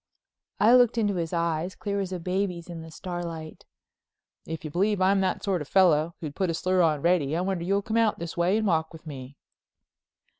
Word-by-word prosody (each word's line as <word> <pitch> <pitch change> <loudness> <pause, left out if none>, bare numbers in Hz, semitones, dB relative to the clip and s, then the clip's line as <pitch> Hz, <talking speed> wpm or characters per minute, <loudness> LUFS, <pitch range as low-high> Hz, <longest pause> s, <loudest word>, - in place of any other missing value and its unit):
I 225 +3 +6
looked 245 -2 +5
into 210 -3 +1
his 165 -2 -2
eyes, 170 +1 -1
clear 200 -1 -3
as 190 -2 -3
a 185 - -3
baby's 180 -1 -2
in 165 -1 -7
the 160 - -10
starlight. 170 -2 -7 0.8
"If 160 0 -6
you 155 - -5
believe 200 +5 +1
I'm 195 +1 +3
the 190 - +1
sort 190 -5 -1
of 150 - -6
fellow 170 -3 +3
who'd 150 -3 -5
put 190 +2 -1
a 165 - -1
slur 185 +2 +1
on 155 -4 +2
Reddy 165 -4 +2
I - - 0
wonder 185 -2 -2
you'll 200 +2 +1
come 220 +2 -1
out 225 -2 +2
this 170 -1 -6
way 175 +4 +2
and 220 - 0
walk 160 -4 0
with 160 0 -13
me." 135 -2 -9
175 Hz, 215 wpm, -26 LUFS, 160-195 Hz, 0.8 s, I